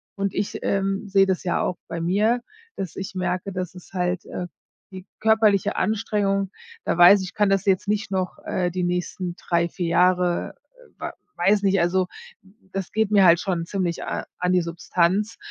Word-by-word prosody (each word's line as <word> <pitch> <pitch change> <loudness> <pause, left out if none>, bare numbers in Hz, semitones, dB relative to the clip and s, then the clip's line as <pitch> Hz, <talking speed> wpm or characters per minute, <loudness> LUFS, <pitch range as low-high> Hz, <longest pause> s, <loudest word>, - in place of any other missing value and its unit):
Und 200 -1 -2
ich, 200 - -2
ähm, 195 +1 -1
sehe 195 0 +4
das 190 -1 -1
ja 175 - +1
auch 180 - -1
bei 165 - -4
mir, 210 +8 +2 0.3
dass 185 -4 -5
ich 195 0 -6
merke, 185 +1 -2
dass 180 -2 -4
es 180 +1 -14
halt 180 0 -1
äh, 180 - -5 0.4
die 185 -1 -9
körperliche 220 -3 +3
Anstrengung, 200 -2 0 0.4
da - - 0
weiß 180 +3 +8
ich, 185 - -5
ich - - -18
kann 205 -2 +3
das 195 0 +1
jetzt 190 0 +2
nicht 205 -1 -1
noch, 185 -2 -2
äh, 180 -1 -1
die 180 0 -2
nächsten 180 0 -2
3, 170 0 0
4 175 0 -3
Jahre, 180 +1 +2 0.2
äh, - - -19
wa - - -5 0.2
weiß 205 +1 +3
nicht, 195 -1 +3
also, 180 +1 +1 0.7
das 195 -2 -4
geht 220 -1 0
mir 200 -2 +6
halt 170 -1 +6
schon 175 -4 -2
ziemlich 180 -4 -2
a - - -4
an 180 0 +1
die 180 - +4
Substanz. 175 +5 0
185 Hz, 190 wpm, -23 LUFS, 180-200 Hz, 0.7 s, weiß